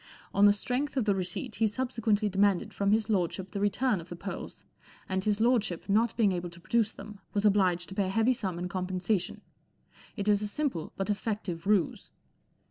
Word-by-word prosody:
On 205 +1 +6
the - - +7
strength 260 +7 -2
of 250 - +2
the 205 - +3
receipt 185 -1 -3
he 220 +1 +3
subsequently 225 -2 0
demanded 200 -1 +2
from 200 0 0
his 215 0 +2
lordship 190 -2 -1
the 200 - -3
return 205 0 +1
of 165 - -14
the 175 - -6
pearls, 195 +3 -7 0.4
and 190 0 -1
his 210 0 +1
lordship, 220 -7 +1
not 215 +3 +2
being 215 -4 +4
able 175 -1 -3
to 170 0 -14
produce 220 +4 +1
them, 210 -2 -10 0.2
was 205 +1 +1
obliged 185 -4 +3
to - - -7
pay 195 -1 0
a - - -2
heavy 225 +5 +3
sum 195 -8 -3
in 180 +1 -3
compensation. 185 +1 -2 0.8
It 200 -1 -3
is 205 -1 +4
a 210 - -1
simple 230 - -2
but 195 +2 -1
effective 200 -4 -3
ruse." 205 -5 +1
205 Hz, 200 wpm, -29 LUFS, 185-220 Hz, 0.8 s, the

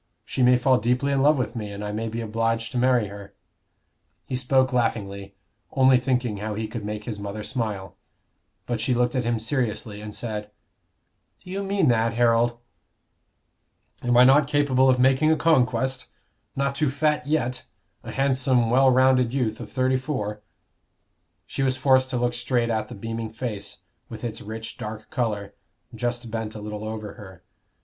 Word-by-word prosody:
she - - -3
may 125 0 +6
fall 130 +1 +3
deeply 125 +5 +1
in 135 -1 +2
love 150 +2 +5
with 125 -4 -2
me, 105 -3 -4
and 100 +1 -6
I 105 - -3
may 110 +2 -3
be 115 +1 -4
obliged 115 +1 -1
to 125 - -1
marry 125 -3 +3
her." 100 0 -11 0.9
He 130 - -4
spoke 130 +1 +2
laughingly, 100 -5 -1 0.4
only 130 -1 +5
thinking 125 -4 -1
how 105 +1 -4
he 110 +1 -3
could 110 0 -6
make 105 0 -4
his 105 -2 -5
mother 100 +1 -5
smile. 100 -7 -4 0.7
But 120 -2 -2
she 125 +2 +1
looked 120 +1 +1
at 130 -3 -1
him 120 0 +1
seriously 110 -3 -2
and 105 0 -7
said, 105 -1 -5 0.9
"Do 180 - -10
you 195 +1 -2
mean 200 0 +1
that, 115 -1 +2
Harold?" 120 0 +3 1.4
"Am 120 0 +2
I 125 - +9
not 140 +3 +6
capable 140 -3 +3
of 130 - +4
making 135 +4 +4
a - - +4
conquest? 130 -5 +1 0.5
Not 140 0 0
too 145 0 +1
fat 150 0 0
yet 145 -5 -1 0.4
a - - -7
handsome, 130 -3 +2
well 130 +2 +5
rounded 130 -1 +4
youth 115 -5 -1
of 110 -3 -8
thirty 130 0 +1
four?" 105 -7 -4 1.0
She - - -4
was 130 -1 +1
forced 130 0 +3
to 130 - -1
look 120 0 0
straight 120 -1 0
at 110 -1 -1
the - - -9
beaming 115 +1 -5
face, 115 -4 -5 0.3
with 110 -1 -9
its 115 -2 -4
rich 110 +1 -7
dark 110 0 -7
color, 105 -5 -2 0.4
just 120 -1 -3
bent 110 -1 -4
a - - -6
little 105 0 -6
over 110 -1 -5
her. 95 -5 -13
120 Hz, 175 wpm, -24 LUFS, 110-130 Hz, 1.4 s, I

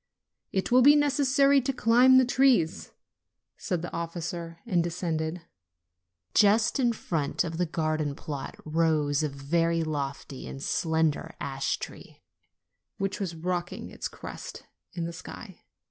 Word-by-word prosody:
"It 190 +4 -1
will 250 +1 +6
be 290 +3 +8
necessary 280 -1 +4
to 265 +2 -1
climb 250 +1 +5
the 260 - +6
trees," 245 -10 +2 0.6
said 180 -5 -3
the 175 - -6
officer, 170 0 -5
and 175 -3 +1
descended. 165 -1 -3 0.9
Just 215 +5 +4
in 240 -3 +3
front 165 -9 -1
of 165 0 -5
the 180 - +1
garden 155 -2 -1
plot 140 -3 -6
rose 155 -2 +1
a 155 - 0
very 165 +4 0
lofty 140 -3 -4
and 135 - -7
slender 160 +1 0
ash 135 -1 -2
tree, - - -10 0.7
which 195 0 -2
was 185 -4 -3
rocking 175 +1 -3
its - - -4
crest - - -9 0.3
in 170 -2 -2
the 170 - -5
sky. - - -10
170 Hz, 135 wpm, -28 LUFS, 155-220 Hz, 0.9 s, be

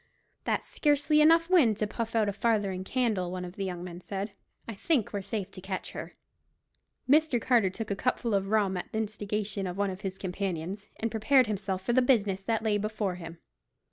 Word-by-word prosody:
"There's - - 0
scarcely 295 0 +2
enough 330 +2 +6
wind 295 - +4
to 215 - +1
puff 230 +2 -4
out 220 -2 +3
a 205 - 0
farthing 200 -3 0
candle," 210 -6 0
one 180 0 -4
of 175 +1 -9
the 200 - -3
young 180 -2 -4
men 175 0 -8
said. 200 +2 -4 0.4
"I 230 - -4
think 235 - 0
we're 200 - -1
safe 200 0 -4
to 185 - -10
catch 190 0 -4
her." - - -7 0.9
Mr. 295 -2 +4
Carter 230 -6 +3
took 215 +3 -5
a - - +1
cupful 240 0 0
of 195 -1 +1
rum 200 -3 +2
at 180 - -6
the - - -3
instigation 210 -2 -2
of 180 +1 -5
one 200 -1 +1
of 185 +1 -8
his 190 -2 -4
companions, 190 +1 -4
and 225 0 -1
prepared 255 +4 +4
himself 195 -3 -3
for 240 - 0
the 255 - +5
business 205 -7 +2
that 225 -1 0
lay 210 -2 +2
before 210 -2 -2
him. 165 -1 -8
205 Hz, 205 wpm, -29 LUFS, 190-230 Hz, 0.9 s, enough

